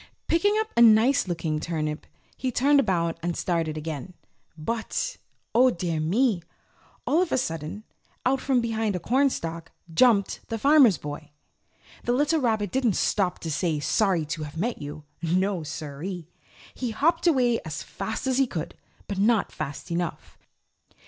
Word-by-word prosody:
Picking 410 +6 +2
up 440 0 -2
a 235 - +4
nice 230 +3 +6
looking 160 -3 -2
turnip, 155 -2 -3 0.3
he 260 - -2
turned 280 +4 +4
about 170 -8 0
and 175 0 -2
started 165 -3 -1
back - - -5
again. 155 +3 -5 0.4
But, 230 - -3 0.4
Oh 255 +2 +6
dear 170 -7 -2
me! 195 +5 +2 0.6
All 325 - +3
of 365 - -1
a - - +2
sudden 165 - -3 0.4
out 265 +1 +2
from 260 -3 +2
behind 225 -3 -1
a - - -1
cornstack 170 - 0 0.2
jumped 210 +1 +4
the 225 - -3
Farmer's 275 - +6
Boy. 150 +1 -7 0.7
The 240 - +1
little 295 +4 +2
rabbit 220 -6 0
didn't 245 -7 +1
stop 190 -4 +1
to 165 - -3
say 160 0 0
sorry 180 +1 +1
to 155 +1 -4
have 150 +1 -7
met 230 +8 -2
you. 145 +1 -7 0.2
No 185 +2 +1
siree. 160 +3 -6 0.5
He 250 - -3
hopped 330 +10 +1
away 250 -7 +3
as 155 - -5
fast 220 +5 -5
as 260 0 +1
he 270 - +4
could, 165 -8 -5 0.3
but 200 -2 -3
not 220 +2 +3
fast 145 +5 -6
enough. 170 0 -3
200 Hz, 160 wpm, -26 LUFS, 165-250 Hz, 0.7 s, nice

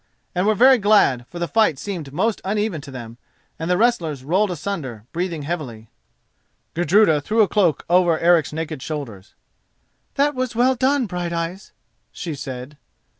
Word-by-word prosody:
and 180 +3 0
were 215 - +3
very 255 +3 +6
glad, 195 - +3
for 175 - -10
the 175 0 -2
fight 220 -9 +2
seemed 170 -5 -6
most 200 +9 -1
uneven 205 -4 -1
to 145 - -11
them, 120 -3 -9 0.4
and 165 +1 -3
the 180 - +3
wrestlers 170 - +1
rolled 190 +8 +1
asunder, 145 - -5
breathing 170 -3 -3
heavily. 130 -9 -6 0.8
Gudruda 175 -2 +3
threw 215 +9 +2
a - - +1
cloak 185 -7 +1
over 175 -2 +3
Eric's 165 -3 +3
naked 155 -2 -5
shoulders. 125 -11 -7 0.8
"That 290 +1 +2
was 255 -3 -3
well 250 +3 +3
done, 265 +1 +1
Brighteyes," 175 0 -4 0.4
she 170 -3 -5
said. 130 +1 -8
175 Hz, 155 wpm, -21 LUFS, 145-210 Hz, 0.8 s, very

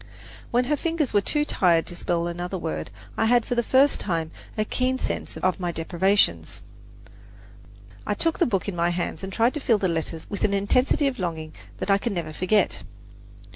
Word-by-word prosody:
When 245 +1 +2
her 290 +4 +1
fingers 325 -2 -1
were 205 - +4
too 295 +7 0
tired 170 - +3
to 175 - -6
spell 170 -1 -1
another 175 +2 -3
word, 165 -2 -4 0.3
I - - +2
had 240 0 +4
for - - -2
the 240 - +2
first 265 +4 +3
time 165 -4 -2 0.3
a 215 - +1
keen 255 +3 0
sense - - -3
of 185 0 0
my 175 -1 -1
deprivations. 185 +5 +1 1.4
I - - +1
took 330 -1 0
the 345 - +4
book 195 -5 -1
in 200 - -3
my 170 0 +2
hands 175 -2 -2
and 195 - -5
tried 230 +5 +2
to 300 - -3
feel 240 -5 +3
the 195 - 0
letters 165 -1 -3
with 200 - -4
an 200 -1 +2
intensity 250 +8 +2
of 275 -4 -1
longing 160 -3 -3 0.2
that - - -1
I 195 - +4
can 225 -1 -2
never 160 -3 -3
forget. 185 +6 +1
195 Hz, 200 wpm, -25 LUFS, 175-245 Hz, 1.4 s, were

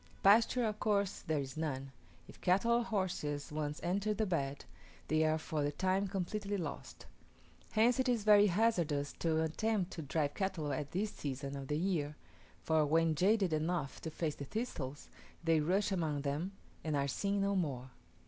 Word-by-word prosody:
Pasture, 230 +4 +5
of 215 -1 -2
course 200 -2 +1
there 160 -1 -1
is 135 -1 -6
none; 135 -4 -3 0.4
if - - -15
cattle 195 +6 +3
or 240 0 +4
horses 175 -10 -2
once 150 0 -3
enter 200 +4 0
the 220 - +1
bed, 140 -7 -2 0.4
they 155 0 +3
are 155 0 +2
for 155 -1 -3
the 145 - 0
time 190 +5 +1
completely 200 +2 -2
lost. 175 - -6 0.7
Hence 230 +3 +4
it 260 0 +2
is 235 -4 +1
very 210 -1 +7
hazardous 170 -8 +1
to 160 -1 +1
attempt 190 +4 0
to 165 - -5
drive 145 0 -1
cattle 180 -7 -2
at 145 +1 -3
this 205 +6 -1
season 140 -4 -5
of 135 -1 -6
the 150 - 0
year; 160 -4 -1 0.5
for 160 -1 +3
when 160 +2 +3
jaded 190 +2 +3
enough 155 -2 -1
to 160 - -4
face 155 -1 -2
the 140 - -7
thistles, 145 - -4 0.4
they 165 -1 +4
rush 190 +7 +1
among 160 -6 0
them, 150 +7 -2 0.3
and 155 -2 -1
are 140 0 +1
seen 200 +8 0
no 200 0 +1
more. 130 -8 -2
165 Hz, 175 wpm, -34 LUFS, 150-200 Hz, 0.7 s, very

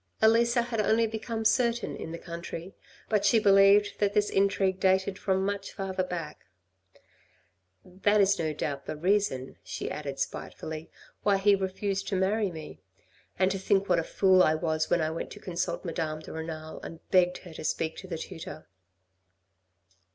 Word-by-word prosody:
Elisa 235 +2 +4
had 235 -2 -1
only 225 +2 +3
become 220 0 -4
certain 235 0 +2
in 160 - -7
the 165 - -5
country, 170 +2 -7 0.3
but 210 -2 +1
she 205 +3 +5
believed 200 0 +5
that 205 0 +1
this 210 0 +2
intrigue 195 -1 +2
dated 190 +1 +2
from 190 -1 +1
much 200 0 -3
further 190 -1 -2
back. 175 -4 -6 1.4
"That 200 +3 +1
is 200 0 +4
no 160 -2 0
doubt 140 -2 -4
the - - -3
reason," 170 -6 0
she - - -5
added 140 -2 -5
spitefully, 155 +3 -5 0.3
"why 200 -1 +3
he 200 +1 +4
refused 195 0 -1
to 200 - -1
marry 200 +2 +1
me. 155 - -9 0.6
And 185 +1 +3
to 195 - -2
think 195 +1 +2
what 175 -2 +4
a - - -1
fool 190 +2 +4
I 155 -3 +4
was 155 -1 -1
when 175 - +3
I 155 0 0
went 165 - -4
to - - -11
consult 175 0 -3
Madame 160 -2 -3
de - - -9
Renal 160 -1 -6
and 165 - -10
begged 180 -1 +4
her 175 - -10
to - - -8
speak 160 +1 -1
to 190 - -9
the 170 -3 -4
tutor." 160 -2 -8
190 Hz, 175 wpm, -28 LUFS, 165-205 Hz, 1.4 s, she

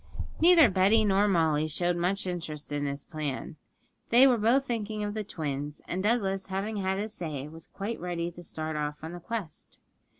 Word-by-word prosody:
Neither 335 -3 +8
Betty 200 +3 +4
nor 200 +1 +3
Molly 160 -5 +2
showed 175 +3 0
much 185 +4 0
interest 160 -5 -5
in 145 0 -1
this 140 0 -3
plan; 155 -1 -5 0.5
they 245 +3 +7
were 250 -4 +4
both 245 +6 +3
thinking 215 -3 -3
of 205 0 -2
the 215 0 -3
twins, 150 -5 -4
and 185 - -2
Douglas, 195 -3 0
having 200 +2 -3
said 190 0 0
his 210 +1 -3
say, 150 -7 -5
was 160 +1 -12
quite 210 +4 -5
ready 175 -1 -3
to 175 - -12
start 160 -2 -5
off 150 0 -3
on 160 - -5
the 175 - -7
quest. 210 -3 -6
180 Hz, 190 wpm, -28 LUFS, 155-210 Hz, 0.5 s, Neither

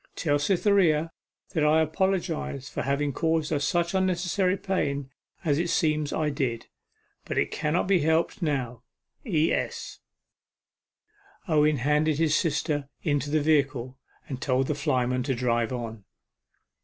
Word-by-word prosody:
Tell 145 -3 +1
Cytherea 170 -2 +2 0.4
that 160 -5 +1
I 150 +1 +4
apologize 165 -5 -1
for - - -4
having 140 +1 0
caused 160 0 0
her 150 - +1
such 170 +4 0
unnecessary 185 0 +1
pain, 140 -8 -2 0.3
as 145 -2 +2
it 170 0 -1
seems 155 -3 +1
I 155 -1 0
did 130 -5 -2 0.6
but - - -4
it - - +1
cannot 155 +3 0
be 195 -2 +4
helped 160 +6 +1
now. 130 -7 -2 0.5
E.S.' 160 -6 -1 1.5
Owen 150 -2 +3
handed 150 +3 +1
his 155 -1 +2
sister 150 -3 0
into 145 -1 0
the 155 +1 +2
vehicle, 140 -4 +1 0.3
and 130 -2 -6
told 130 -2 +1
the 150 - -1
flyman 130 -4 0
to 135 +1 -1
drive 120 -1 0
on. 115 -4 -5
150 Hz, 135 wpm, -26 LUFS, 140-165 Hz, 1.5 s, I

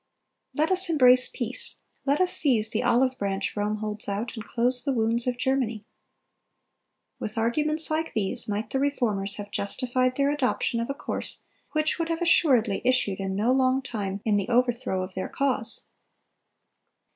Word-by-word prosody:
Let 310 +4 +1
us 375 -1 +3
embrace 255 -5 +6
peace; 245 -1 -4 0.3
let 280 +2 +2
us 370 -1 +2
seize 225 -7 +1
the 220 - 0
olive 255 +1 +2
branch 195 -1 -2
Rome 210 0 -1
holds 210 -1 -2
out, 210 +5 -3
and 220 - -6
close 245 +2 +2
the 275 0 -1
wounds 230 +1 +1
of 250 -1 -1
Germany. 250 -5 -1 1.3
With 215 +1 -6
arguments 300 +8 +1
like 320 +1 -2
these 220 +2 +1
might 210 +2 -3
the 265 - 0
Reformers 220 -8 +1
have 205 -1 -8
justified 255 +4 -1
their 280 0 +2
adoption 255 -4 0
of 230 - -3
a 275 - -2
course - - -4 0.3
which 310 +2 0
would 330 0 -2
have 330 0 -1
assuredly 250 - +3
issued 245 -6 +1
in 195 0 -3
no 215 +5 +1
long 260 0 +2
time 200 -5 -4
in 210 -2 +2
the 200 +3 -2
overthrow 240 -6 +1
of 185 0 -7
their 185 - -4
cause. 265 -5 0
245 Hz, 170 wpm, -26 LUFS, 210-270 Hz, 1.3 s, embrace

